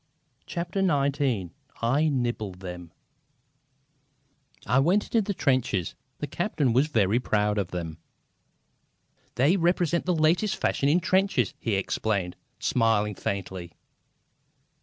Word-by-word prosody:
CHAPTER 175 +2 -3
XIX 140 - +1 0.3
"I 140 +7 +2
NIBBLE 120 -7 -2
THEM" 90 -2 -9 1.7
I 130 - +3
went 180 +9 +3
into 230 - +1
the 200 -1 -3
trenches. 130 - 0 0.2
The - - -3
captain 130 -6 -1
was 135 +5 +3
very 110 -5 +2
proud 105 -3 +1
of 100 - -1
them. 85 -3 -5 1.4
"They 145 +10 +3
represent 175 -1 +1
the 180 - +2
latest 170 +7 +2
fashion 140 - 0
in 170 +5 +3
trenches!" 185 - +1
he 110 -4 -1
explained, 95 -1 -1 0.2
smiling 110 -3 +1
faintly. 95 -4 -5
125 Hz, 115 wpm, -26 LUFS, 100-165 Hz, 1.7 s, I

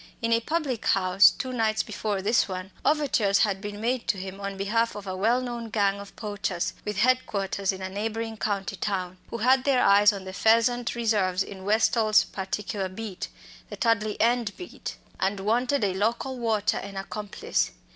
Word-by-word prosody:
In 230 -1 +1
a 230 - +4
public 275 -2 -2
house 190 +1 +6
two 255 -1 -5
nights 220 -3 +1
before 205 -3 -3
this 220 +4 +3
one, 185 0 -6
overtures 270 -10 +2
had 195 -3 +1
been 205 0 -6
made 240 +2 -1
to 200 - +1
him 190 +1 -7
on 200 0 -4
behalf 230 +4 0
of 205 -1 -7
a 185 -1 -4
well 225 +6 +2
known 240 -2 -5
gang 200 -2 +1
of 200 0 -11
poachers 200 -4 -3
with 210 -1 -4
head 255 +4 +3
quarters 195 -1 -1
in 190 0 -7
a - - -2
neighbouring 220 +3 -3
county 200 -2 -2
town, 185 -2 -3
who 235 - -4
had 255 +3 +3
their 265 -3 +3
eyes 205 +1 +6
on 200 -2 -6
the 190 0 -8
pheasant 230 +5 +3
preserves 205 -6 +1
in 190 -1 -10
Westall's 215 +1 +4
particular 195 0 -4
beat 195 0 -6 0.4
the - - -7
Tudley 215 -2 +1
End 235 -2 +1
beat 360 - -7 0.2
and 195 +1 0
wanted 240 +5 +1
a 195 -2 +1
local 230 +7 -1
watcher 225 -4 0
and 200 -1 -7
accomplice. 210 - -2
210 Hz, 185 wpm, -26 LUFS, 195-230 Hz, 0.4 s, house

